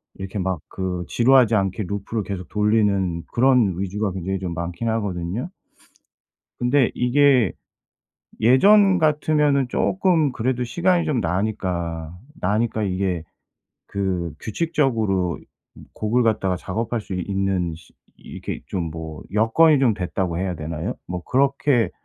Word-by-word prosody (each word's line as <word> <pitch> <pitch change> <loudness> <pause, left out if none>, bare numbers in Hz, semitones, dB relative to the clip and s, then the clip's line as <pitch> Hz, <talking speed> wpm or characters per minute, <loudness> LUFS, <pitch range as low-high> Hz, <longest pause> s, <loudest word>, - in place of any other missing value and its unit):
이렇게 95 +2 -6
막 95 -3 -1
그 90 -2 -3
지루하지 120 -2 +4
않게 95 +1 0
루프를 100 +2 -3
계속 95 -4 -6
돌리는 105 -5 +1
그런 125 -6 +4
위주가 100 +1 -2
굉장히 95 +1 -3
좀 90 -3 -4
많기는 85 +7 -3
하거든요. 100 - -3 1.1
근데 125 +1 +2
이게 125 - +3 0.9
예전 190 - +5
같으면은 150 -3 +2
쪼끔 170 -3 +1
그래도 125 +1 -1
시간이 175 +6 +1
좀 130 -6 0
나니까, 85 -3 -2 0.2
나니까 110 +3 0
이게 95 -3 -1 0.6
그 95 -5 -2
규칙적으로 110 - 0 0.4
이 - - -14
곡을 115 +4 +1
갖다가 105 -5 +1
작업할 115 +6 -3
수 95 - -7
이 90 - -2
있는 95 -4 -1
시 85 +1 -17 0.3
이 - - -22
이렇게 - - -6
좀 85 -4 -3
뭐 80 -1 -7
'여건이 135 +8 +4
좀 125 -6 +3
됐다.'고 90 -1 -2
해야 95 -1 -2
되나요. 80 0 -4
뭐 90 -1 -5
그렇게 135 -2 +2
105 Hz, 285 characters per minute, -22 LUFS, 90-125 Hz, 1.1 s, 예전